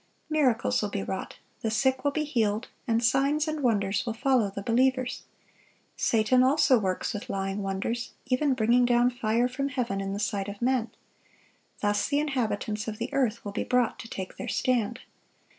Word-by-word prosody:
Miracles 270 -7 +2
will 210 - -1
be 200 -1 -3
wrought, 190 0 -5 0.2
the 220 - 0
sick 260 +4 +1
will 285 - +3
be 305 +2 -1
healed, 230 -6 0 0.2
and 230 0 +1
signs 280 +6 +2
and 310 -1 -2
wonders 205 -6 +1
will 230 -2 -3
follow 245 -3 +2
the 200 0 -6
believers. 255 +3 +1 0.7
Satan 230 +3 +3
also 265 -1 +4
works 185 -3 -1
with 220 +5 -6
lying 195 0 -2
wonders, 195 +5 -3
even 265 +1 +1
bringing 240 +1 +3
down 245 0 +3
fire 240 0 +1
from 275 +3 -2
heaven 235 -7 -2
in 195 0 -3
the 200 - -3
sight 205 -1 -1
of 200 0 -7
men.(1052) 245 -1 +1 0.9
Thus 205 0 +1
the 285 - +1
inhabitants 225 -7 -2
of 215 -1 -4
the - - -4
earth 240 -5 0
will 205 - -4
be - - -2
brought 250 -1 +1
to - - -8
take 190 -1 -6
their 245 - -5
stand. 240 0 0
235 Hz, 180 wpm, -27 LUFS, 210-260 Hz, 0.9 s, also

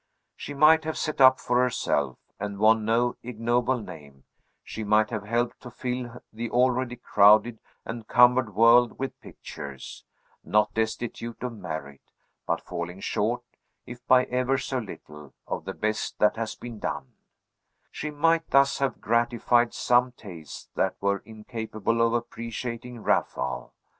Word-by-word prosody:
She 145 - -7
might 155 +3 +6
have 160 0 -3
set 155 -3 -2
up 130 0 +7
for 125 0 +1
herself, 75 - 0 0.2
and 100 -1 -4
won 110 +1 +4
no 120 +2 +1
ignoble 120 +2 0
name; 75 - -11 0.4
she 110 - -6
might 105 +1 +3
have 110 -3 -4
helped 120 +2 -1
to 125 - -9
fill 125 0 -5
the 115 +1 -4
already 125 0 +1
crowded 110 0 +4 0.3
and 115 -1 -7
cumbered 125 -4 +4
world 115 +2 +5
with 135 0 -5
pictures, 70 -2 -9 0.4
not 105 0 +2
destitute 115 +1 -3
of 125 -1 -3
merit, 80 -9 -7 0.5
but - - 0
falling 90 +1 -6
short, 115 +5 -1 0.4
if 125 0 -10
by 130 -1 +6
ever 125 +2 0
so 130 0 -2
little, 75 - -11
of - - -5
the 95 - -4
best 110 0 -2
that 105 - +3
has 115 -1 -4
been 120 -3 -9
done; 65 - -4 0.8
she 150 - -5
might 165 +2 +1
thus 140 0 +4
have 135 -1 -1
gratified 120 +1 +2
some 125 +1 +2
tastes 90 -10 -10
that - - 0
were 100 0 0
incapable 110 0 -3
of 115 0 +3
appreciating 115 0 -5
Raphael. 65 -1 -1
115 Hz, 145 wpm, -26 LUFS, 105-125 Hz, 0.8 s, up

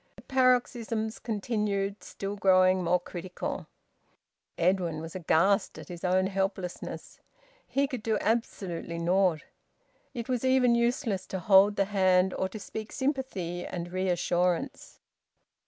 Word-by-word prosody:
The - - -15
paroxysms 240 -4 +1
continued, 205 -3 -2
still 200 +1 -5
growing 185 -1 +4
more 175 +1 +2
critical. 180 +1 -6 0.9
Edwin 175 -2 +1
was 165 +1 -7
aghast 190 +3 +2
at - - -10
his 175 -1 -8
own 185 +1 +2
helplessness. 190 -2 -4 0.5
He 280 +1 +1
could 260 -5 -5
do 220 0 0
absolutely 195 -7 -2
naught. 175 -1 +2 0.7
It 235 -2 -4
was 250 -2 -1
even 260 -2 +4
useless 235 -4 0
to 190 - -4
hold 195 +3 +5
the 195 - +2
hand 185 -2 +3
or 190 - -1
to 215 - -7
speak 215 +1 -7
sympathy 260 - -2
and 175 -1 -5
reassurance. 180 -1 -1
195 Hz, 125 wpm, -28 LUFS, 180-225 Hz, 0.9 s, hold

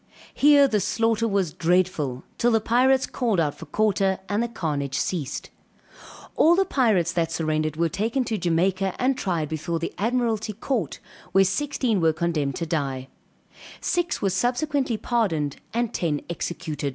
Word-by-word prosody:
Here 285 -1 +6
the 215 -5 +1
slaughter 225 +3 +1
was 195 -7 0
dreadful, 165 -7 0 0.2
till 240 - +3
the 225 -2 +3
pirates 255 +4 +3
called 230 -8 -1
out 150 -3 +1
for - - -11
quarter, 195 -3 +1
and 205 +2 0
the 235 - 0
carnage 145 - -3
ceased; 160 -8 -3 0.8
all 335 +2 +5
the 385 +1 +3
pirates 215 - +2
that 165 -2 0
surrendered 155 -1 -1
were 170 +1 +1
taken 225 +8 -1
to 225 -3 -2
Jamaica 185 +3 +1
and 260 +1 +1
tried 175 -10 -1
before 160 +2 -3
the 165 - -4
Admiralty 225 -1 0
court 230 +2 -2 0.4
where 195 +1 +6
sixteen 235 0 0
were 160 -1 +3
condemned 155 -5 -1
to 170 - -3
die, 135 -5 -2 0.7
six 350 -8 -1
were 195 - +2
subsequently 250 - 0
pardoned 175 - -1
and 235 -1 -1
ten 150 -4 -1
executed. 155 -4 -4
190 Hz, 155 wpm, -24 LUFS, 165-235 Hz, 0.8 s, Here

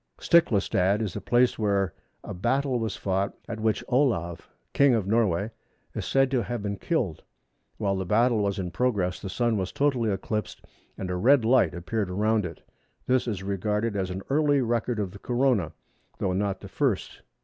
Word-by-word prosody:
Stiklastad 100 - +3
is 100 -5 -4
a - - -4
place 120 0 +2
where 100 -4 +1 0.3
a - - -6
battle 130 +6 0
was 110 -3 -2
fought, 95 0 -1
at 115 - -5
which 110 -1 0
Olav, 105 - 0 0.2
King 140 -3 +5
of 110 -4 0
Norway, 105 -1 +1 0.4
is - - -4
said 135 -1 +2
to 130 -3 +2
have 120 -2 -4
been 100 -1 -3
killed. 120 - -1 0.6
While 100 -2 0
the 95 - -2
battle 115 +4 +3
was 100 -1 0
in 90 -3 -3
progress 95 -4 0
the 95 - -6
Sun 115 +4 0
was 95 -1 -2
totally 130 -6 +1
eclipsed, 105 +1 -3 0.3
and 95 -1 -4
a - - -1
red 120 +6 +4
light 115 -9 +3
appeared 100 +3 -2
around 105 +1 +1
it. 80 - -12 0.4
This 130 -1 +1
is 100 -5 -3
regarded 105 +3 -1
as 95 -2 -1
an 95 +1 -5
early 145 -1 +3
record 120 0 0
of 100 -3 -2
the 100 - -11
Corona, 120 - +1 0.5
though 95 - -1
not 100 0 -1
the - - -8
first. - - -1
105 Hz, 180 wpm, -26 LUFS, 95-120 Hz, 0.6 s, King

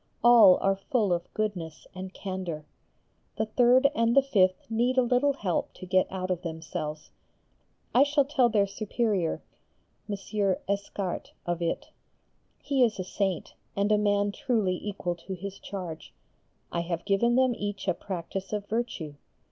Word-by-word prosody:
All 230 -6 +8
are 195 0 +3
full 200 0 0
of 175 0 -3
goodness 180 -8 -3
and 185 0 -7
candour. 185 -6 -5 0.7
The 220 - +1
third 245 +4 +5
and 230 -2 +2
the 275 - +7
fifth 185 -8 +2
need 240 +3 +1
a 255 - +6
little 250 +4 +3
help 195 -10 -2
to 185 - -9
get 185 0 +2
out 185 -1 -3
of 180 -1 -1
themselves. 160 -2 -5 0.8
I 250 - +6
shall 285 0 +4
tell 265 -4 +3
their 210 -3 +3
Superior, 200 -2 -1 0.7
M. 205 - -1 0.5
Escarts, 200 -2 -3
of 175 0 -2
it. 170 - -2 0.7
He 275 -3 +2
is 225 -3 +2
a - - -1
Saint, 190 -1 -2 0.2
and 200 +1 +1
a 210 - +5
man 205 -1 +2
truly 220 -7 0
equal 195 -4 -2
to 190 +3 -6
his 195 +2 -7
charge. 180 -5 -7 0.6
I 170 - -1
have 170 0 -3
given 220 +4 +3
them 260 -1 +4
each 205 -2 -4
a - - +3
practice 190 +1 -5
of 205 -1 -2
virtue. 210 -9 -3
200 Hz, 155 wpm, -28 LUFS, 185-235 Hz, 0.8 s, All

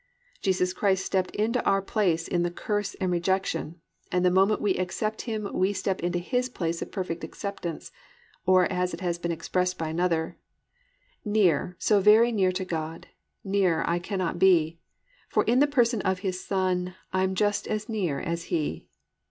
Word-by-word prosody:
"+ - - -33
Jesus 185 -1 +1
Christ 190 -2 +1
stepped 185 -1 0
into 230 +4 0
our 195 - +3
place 190 -5 0
in 175 - 0
the 175 - +1
curse 205 +3 -3
and 185 -2 -1
rejection, 175 -2 -1 0.3
and 180 0 +2
the 180 - +5
moment 195 +3 +3
we 205 -2 +2
accept 215 +4 -2
Him 215 -2 -2
we 190 +2 +1
step 190 -1 -2
into 175 +1 0
His 250 +8 -1
place 170 -7 -3
of - - -5
perfect 180 -4 -4
acceptance, 190 -5 -5 0.5
or 185 0 +5
as 180 0 -1
it - - -13
has 175 -2 -1
been 170 0 -2
expressed 180 +2 -1
by 160 -1 -3
another: 165 0 -1 0.8
"Near, 185 -6 +2
so 210 -2 +3
very 215 +4 +6
near 190 -5 +2
to 185 +1 -3
God, 160 -2 -5 0.3
Nearer 195 -4 +1
I 170 +1 +1
cannot 185 -1 -3
be; 165 -3 +4 0.5
For - - +2
in 240 +3 +3
the 290 - +5
person 240 -6 +2
of 190 -1 -1
His 185 -1 -2
Son, 185 -2 -1 0.2
I'm 190 0 +1
just 205 +1 +1
as 215 0 -2
near 190 - -1
as 170 -1 -3
He. 155 -3 -2
185 Hz, 175 wpm, -27 LUFS, 175-205 Hz, 0.8 s, very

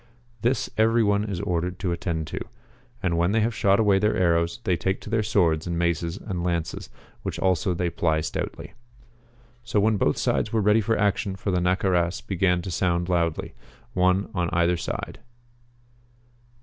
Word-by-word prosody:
This 120 +4 +1
every 115 +1 +4
one 100 0 +2
is 100 -5 -4
ordered 90 +1 -2
to 90 -1 -2
attend 85 -2 -2
to. - - -5 0.6
And 85 -3 +1
when 85 +4 +2
they 110 - +3
have 115 +2 +1
shot 100 0 +3
away 100 -3 +4
their 105 +2 +1
arrows 85 -2 +1
they 90 - +1
take 95 +3 -1
to 110 - -9
their 115 -1 +2
swords 90 -7 +1
and 85 -1 -2
maces 85 +1 0
and 90 -6 -4
lances, 85 -2 -2 0.3
which - - -4
also 90 -1 +1
they 85 0 -1
ply 80 -1 +1
stoutly. - - -5 0.9
So 105 - 0
when 110 +1 +3
both - - +1
sides - - 0
were 115 - +1
ready 105 +2 +4
for 115 +2 0
action 100 0 0
the 95 -1 -1
Naccaras 90 -1 +1
began 90 -2 0
to 95 - -5
sound 85 0 0
loudly, 85 -3 0 0.4
one 90 +2 +2
on 90 -2 0
either 85 +1 +2
side. 85 - -5
90 Hz, 175 wpm, -25 LUFS, 85-100 Hz, 0.9 s, every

